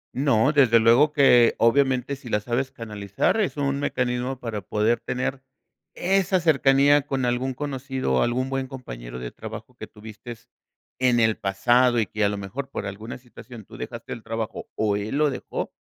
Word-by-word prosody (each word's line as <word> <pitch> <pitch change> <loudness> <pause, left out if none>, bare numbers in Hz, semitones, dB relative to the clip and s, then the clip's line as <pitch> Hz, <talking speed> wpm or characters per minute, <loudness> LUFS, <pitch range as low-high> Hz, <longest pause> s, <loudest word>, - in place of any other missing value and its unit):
No, 135 0 +3
desde 120 -5 +5
luego 120 +7 +5
que, 125 -5 +5
obviamente, 130 +2 +2
si 130 -3 -11
la 105 - +1
sabes 125 +5 -2
canalizar, 105 - -1
es 185 - -2
un 140 -1 -1
mecanismo 125 -1 -2
para 110 -4 -4
poder 105 +5 0
tener 130 +1 -3 0.5
esa 190 0 +1
cercanía 140 -2 +4
con 135 -2 -1
algún 125 +1 -1
conocido 130 - -3
o 65 - +3
algún 125 +2 0
buen 135 -1 -2
compañero - - -8
de 60 -1 -6
trabajo - - -9
que - - -9
tuviste 110 +2 -10 0.6
en 125 -2 +3
el 110 -1 +3
pasado, 120 +4 +2
y 110 - +1
que 105 0 -3
a 100 - +3
lo 105 - -3
mejor 125 +8 -6
por 105 - -5
alguna 105 +5 -7
situación 120 -3 -13
tú - - -14
dejaste - - -7
el 115 - -8
trabajo 115 -1 -5
o 105 -2 +1
él 110 +7 -3
lo 150 -2 +2
dejó. - - -5
125 Hz, 180 wpm, -24 LUFS, 110-135 Hz, 0.6 s, desde